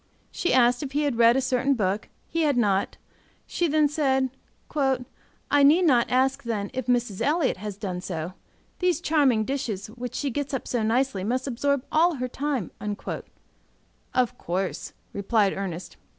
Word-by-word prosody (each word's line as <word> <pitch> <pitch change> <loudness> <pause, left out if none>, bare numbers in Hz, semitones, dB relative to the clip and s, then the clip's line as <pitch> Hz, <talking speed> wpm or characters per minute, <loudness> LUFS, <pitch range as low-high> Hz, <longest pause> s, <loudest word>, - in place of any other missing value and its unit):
She 355 - -1
asked 245 -1 +4
if 275 -2 -5
he 295 +1 +1
had 275 -5 -1
read 235 +2 +6
a - - +2
certain 265 +1 +1
book; 200 -2 -1 0.2
he 330 - -1
had 290 -4 +2
not; 200 -4 +1 0.5
she 345 - 0
then 305 -1 +3
said, 265 -3 +1 0.4
"I 270 +1 -1
need 305 +6 +6
not 245 -7 +4
ask, 260 +1 +2
then, 210 -4 -3
if 255 -1 -4
Mrs. 240 -5 0
Elliott 300 - +1
has 205 0 -6
done 185 -4 -4
so? 175 -1 -4 0.5
These 360 -3 +2
charming 285 -10 +2
dishes, 215 -7 -3
which 245 +1 -6
she 285 -2 -1
gets 280 +2 -2
up 265 - -5
so 240 - 0
nicely, 225 -2 +1
must 250 +5 -1
absorb 280 +1 0
all 335 +2 +4
her 255 -1 -2
time." 270 - -2 1.4
"Of 250 -1 0
course," 185 +2 -3 0.2
replied 200 0 +2
Ernest. 185 -3 -5
250 Hz, 165 wpm, -26 LUFS, 215-280 Hz, 1.4 s, read